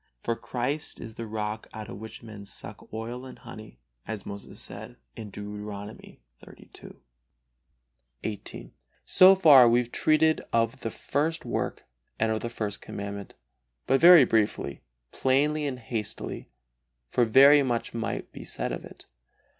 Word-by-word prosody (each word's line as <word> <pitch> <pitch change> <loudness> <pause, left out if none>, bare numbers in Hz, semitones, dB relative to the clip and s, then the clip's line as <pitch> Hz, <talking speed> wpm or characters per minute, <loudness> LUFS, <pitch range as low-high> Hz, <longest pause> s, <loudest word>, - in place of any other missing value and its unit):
For 115 - -2
Christ 135 +7 -2
is 110 - -8
the 115 +1 -7
rock 105 0 -4
out 110 -1 -7
of - - -8
which 110 +1 -10
men 105 -3 -10
suck - - -10
oil 115 +3 -5
and 130 - -10
honey, 110 - -12 0.3
as 110 -3 -5
Moses 100 0 -8
says, - - -7 0.2
Deuteronomy 105 - -8 0.2
xxxii. - - -14 1.4
XVIII. 105 -2 -6 0.3
So 185 +1 +7
far 145 -10 +8
we 120 - +4
have 120 -1 -1
treated 155 0 +3
of 115 +2 +1
the 115 - -2
first 155 +7 -2
work - - -3 0.3
and 110 0 +1
of 110 - 0
the 120 - -3
First 105 -3 -4
Commandment, 100 0 -7 0.5
but 135 - +2
very 170 -4 +9
briefly, 110 -3 0 0.3
plainly 145 +3 +1
and 130 -2 -3
hastily, 110 -3 -5 0.6
for 125 - +3
very 140 +6 +7
much 120 -4 -2
might 115 -1 -4
be - - -9
said - - -2
of - - -5
it. - - -13
115 Hz, 145 wpm, -27 LUFS, 105-135 Hz, 1.4 s, very